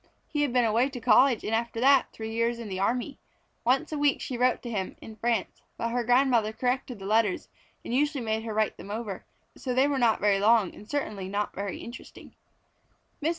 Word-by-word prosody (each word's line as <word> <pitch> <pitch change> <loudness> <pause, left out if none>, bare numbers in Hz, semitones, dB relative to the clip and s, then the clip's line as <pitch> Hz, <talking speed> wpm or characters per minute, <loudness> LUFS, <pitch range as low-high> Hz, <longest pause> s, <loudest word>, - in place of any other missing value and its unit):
He 295 - -2
had 290 -3 +1
been 245 -1 +3
away 230 +4 +2
to 265 -2 -7
college 250 +1 +4
and 220 - -2
after 230 0 -1
that, 270 +1 +4
three 220 0 -6
years 230 +1 0
in 230 -3 -7
the 190 -1 -4
army. 245 +7 -1 0.4
Once 255 +5 +1
a 305 - -2
week 290 -1 +2
she 255 - -4
wrote 250 +1 +1
to 240 - -5
him, 195 -4 -3
in 220 - -10
France; 225 -2 -1 0.2
but 230 - -2
her 245 0 0
grandmother 245 -2 +3
corrected 250 +2 -2
the 195 - -9
letters 215 -2 +1 0.4
and - - -4
usually 285 0 +1
made 220 0 -1
her 225 -1 -5
write 215 -1 0
them - - -10
over, 210 -3 -5 0.3
so 250 -2 -4
they 265 +2 +4
were 280 -2 0
not 230 -3 +3
very 200 -1 +3
long 215 -2 +4
and 210 - -14
certainly 215 -10 -3
were - - -6
not 205 +1 -2
interesting. 200 +5 -7 0.9
Mrs. 305 - +1
235 Hz, 215 wpm, -27 LUFS, 215-255 Hz, 0.9 s, college